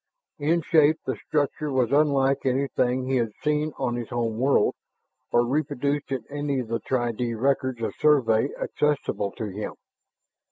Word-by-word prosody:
In 160 +3 +1
shape, 155 -1 +4
the - - -1
structure 150 0 -1
was 130 -2 +1
unlike 140 -2 +3
anything 130 -1 0
he 130 0 +1
had 115 -3 -1
seen 150 +1 +1
on 120 0 -1
his 120 -2 -5
home 115 -2 -2
world 135 +2 +3 0.6
or 120 0 +4
reproduced 145 +1 -1
in 130 -4 -2
any 145 -1 -2
of 120 -3 -5
the 115 0 -1
tri 120 +1 -1
dee 115 0 -3
records 130 0 0
of - - -2
Survey 135 -5 +3
accessible 145 -8 -1
to 110 - -5
him. 105 +2 -5
135 Hz, 160 wpm, -25 LUFS, 120-145 Hz, 0.6 s, shape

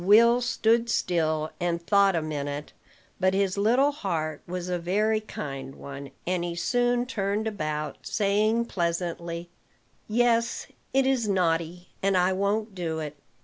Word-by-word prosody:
Will 235 +5 +6
stood 235 -1 +2
still, 160 -6 0
and 175 -1 0
thought 200 +2 +4
a 165 - 0
minute; 145 -1 -4 0.5
but 185 0 +3
his 195 -1 +1
little 240 +8 +3
heart 160 - -3
was 180 0 -4
a 180 -1 -1
very 210 +5 +1
kind 135 -10 -6
one, 140 0 -8 0.2
and 180 -1 0
he 175 -1 -3
soon 245 +6 +1
turned 205 -3 -1
about, 155 -8 -3
saying 215 +3 +1
pleasantly: 170 -2 -3 0.6
"Yes, 230 +1 +2 0.3
it 270 0 +3
is 260 -4 +2
naughty, 175 -1 0
and 195 -1 +2
I 180 +1 +3
won't 205 +3 0
do 170 -4 -3
it. 150 -2 -5
185 Hz, 145 wpm, -27 LUFS, 170-220 Hz, 0.6 s, Will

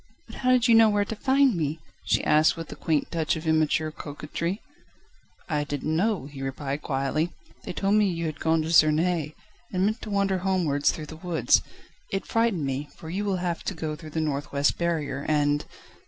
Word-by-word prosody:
"But - - -11
how 255 - 0
did 255 -1 +4
you 235 - +6
know 225 -1 +7
where 205 -1 +2
to 220 - -5
find 270 +2 +3
me?" 155 -1 -2 0.3
she - - +1
asked 155 +2 +4
with 165 -1 -7
a - - -6
quaint 155 -3 -1
touch 165 -1 0
of 160 +1 -6
immature 155 0 +2
coquetry. 155 +6 -4 0.9
"I 150 -3 0
didn't 145 +2 -2
know," 195 -3 +1
he 140 -1 -9
replied 135 +2 -3
quietly. 140 +4 -1 0.4
"They - - -4
told 195 +3 0
me 210 -2 +4
you 170 -2 -3
had 155 -1 -4
gone 160 0 +2
to 160 - -3
Suresness, 155 0 +3 0.4
and 185 0 +1
meant 215 +3 -1
to 220 - -7
wander 200 -2 +1
homewards 175 -7 +1
through 155 - -6
the 160 +1 -10
woods. 170 -1 +2 0.5
It 195 +1 -2
frightened 225 -9 +1
me, 135 +2 -3
for 160 - -9
you 195 +4 -2
will 195 -2 0
have 170 -1 -2
to 195 - -3
go 155 -1 -3
through 155 0 -10
the 160 +1 -2
north 145 -2 -2
west 140 0 +1
barrier, 155 -5 -1
and 145 -1 +2
160 Hz, 205 wpm, -26 LUFS, 150-195 Hz, 0.9 s, know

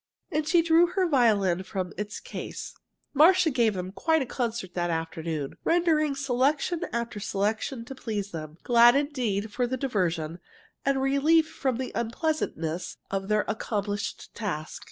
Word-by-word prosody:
And 305 -1 -1
she 335 +1 +4
drew 335 +1 +5
her 370 +1 +1
violin 210 - +3
from 185 -1 -4
its 210 0 -5
case. - - -7 0.4
Marcia 330 +3 +6
gave 235 -5 +2
them 185 0 -4
quite 320 +10 +1
a - - -6
concert 235 -7 -3
that 175 -1 -1
afternoon, 160 -3 -3
rendering 315 -4 +2
selection 280 +5 +1
after 235 -2 -3
selection 215 +5 -2
to 270 - -7
please 210 -6 -4
them, 155 -1 -7
glad 240 0 +6
indeed 255 -8 0
of 240 +3 -2
the 260 - -1
diversion 175 - -1 0.4
and 275 -1 +1
relief 305 +4 +4
from 260 -6 -2
the 260 0 -4
unpleasantness 225 - -2
of 195 0 -2
their 210 0 +2
accomplished 205 -2 -3
task. 180 -8 -4
235 Hz, 150 wpm, -27 LUFS, 195-280 Hz, 0.4 s, Marcia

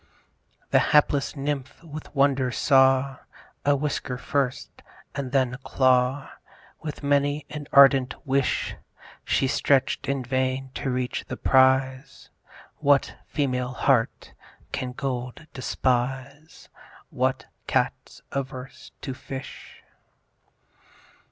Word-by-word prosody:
The - - +6
hapless 145 -1 +2
Nymph 140 +1 -4
with 155 -1 -10
wonder 135 -2 +3
saw: 135 0 +3 0.5
A 145 0 +3
whisker 140 -3 -2
first 135 0 -2 0.3
and 135 -3 -4
then 130 -3 +2
a - - -5
claw, 130 +1 +2 0.5
With 150 -2 -6
many 145 +1 +1
an 150 -1 -6
ardent 135 -2 +6
wish, 135 -1 0 0.5
She - - +1
stretch'd 135 +1 +1
in 140 -2 -1
vain 130 +1 -1
to 140 - -3
reach 125 -1 -2
the - - -5
prize. 130 +1 +2 0.5
What 140 -1 +3
female 125 -3 -1
heart 130 -3 +1 0.4
can 125 -1 -3
gold 125 +2 -4
despise? 130 +3 -2 0.4
What 130 +1 -1 0.2
Cat's - - -2
averse 130 -1 -6
to 135 - -4
fish? 130 0 -9
135 Hz, 105 wpm, -25 LUFS, 130-140 Hz, 0.5 s, The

